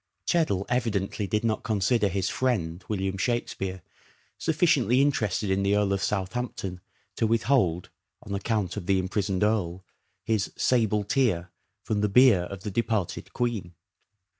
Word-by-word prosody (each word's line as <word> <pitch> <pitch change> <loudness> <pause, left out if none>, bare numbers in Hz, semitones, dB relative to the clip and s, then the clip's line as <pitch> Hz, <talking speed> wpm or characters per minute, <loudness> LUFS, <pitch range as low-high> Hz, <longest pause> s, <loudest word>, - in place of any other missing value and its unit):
Cheddle 155 - +1
evidently 110 -4 -1
did 105 +1 0
not 110 -2 0
consider 105 +1 +2
his 95 0 -1
" - - -5
friend," 90 -9 0
William 95 -2 -1
Shakspere, 95 -5 -2 0.6
sufficiently 150 -6 +3
interested 110 -7 +1
in 95 +1 +1
the 100 +1 +2
Earl 105 -1 +2
of 100 - -1
Southampton 95 -2 -3 0.4
to 115 - +2
withold, 110 -7 +1 0.3
on 100 - -6
account 100 -2 -1
of 90 -4 -5
the 95 - +3
imprisoned 95 +1 -1
earl, 95 -4 0 0.4
his 110 -3 0
" - - -34
sable 110 -4 +2
tear" 100 -8 0 0.3
from 105 -1 -1
the 105 - +2
bier 110 -5 +6
of 100 +1 -8
the 105 - -4
departed 110 -3 -2
Queen. 110 -8 -2
105 Hz, 150 wpm, -27 LUFS, 95-115 Hz, 0.6 s, bier